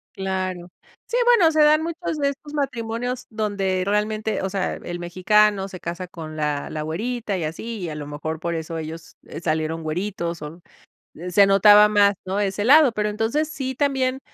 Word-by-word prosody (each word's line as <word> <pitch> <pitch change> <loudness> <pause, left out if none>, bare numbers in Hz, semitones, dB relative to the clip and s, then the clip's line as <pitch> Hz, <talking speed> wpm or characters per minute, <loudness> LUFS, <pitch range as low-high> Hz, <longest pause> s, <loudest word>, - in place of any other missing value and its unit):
Claro. 185 -2 -3 0.4
Sí, 485 - -1
bueno, 415 -10 +5
se 310 - 0
dan 305 +1 +5
muchos 335 -1 -4
de 280 -1 +1
estos 290 +2 -9
matrimonios 245 -3 -3
donde 200 -4 -1
realmente, 215 +1 -1
o 190 - -1
sea, 195 -1 -2
el 175 0 -6
mexicano 195 +3 +2
se 185 -2 -10
casa 175 +2 -5
con 155 -3 -9
la 150 -1 -2
la 155 -1 -4
güerita 215 +6 -3
y 170 - -3
así, 215 +8 -5
y 175 - -4
a 150 - -6
lo 145 -1 -6
mejor 155 +2 -5
por 170 0 -3
eso 165 0 -5
ellos, 160 +1 -8
eh, 155 - -8
salieron 160 0 -1
güeritos 170 0 -3
o 155 +4 -8 0.7
se 200 +2 +6
notaba 205 +2 +7
más, 205 -1 +4
¿no?, 195 +2 -1
ese 200 0 -1
lado. 285 -2 +7
Pero, 210 -1 -1
entonces, 225 +9 -1
sí 265 -4 -4
también, 265 -1 0
200 Hz, 185 wpm, -23 LUFS, 170-245 Hz, 0.7 s, notaba